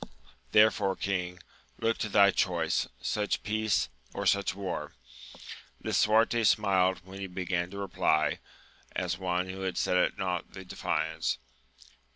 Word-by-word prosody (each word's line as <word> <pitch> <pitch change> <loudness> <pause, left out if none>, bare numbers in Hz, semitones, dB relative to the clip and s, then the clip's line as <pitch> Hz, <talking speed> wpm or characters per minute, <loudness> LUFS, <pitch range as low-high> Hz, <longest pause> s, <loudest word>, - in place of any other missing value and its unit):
Therefore, 105 -2 +4
king, 90 -2 -2 0.4
look 115 0 0
to 110 - -2
thy 100 0 +6
choice! 85 -4 0 0.2
such 105 -1 -1
peace, 110 -1 +1 0.3
or - - -3
such 100 -2 +2
war! 90 -6 -4 0.9
Lisuarte 115 +2 +3
smiled 95 -3 +3
when 95 +1 -10
he 95 - -4
began 90 -1 -2
to 100 - -9
reply, 80 -5 +1 0.6
as 90 -1 -2
one 90 -1 -1
who 95 0 -3
set 90 - +1
at 90 - +2
nought 90 -2 -3
the 95 -1 -9
defiance. 90 - -1
95 Hz, 130 wpm, -29 LUFS, 90-100 Hz, 0.9 s, thy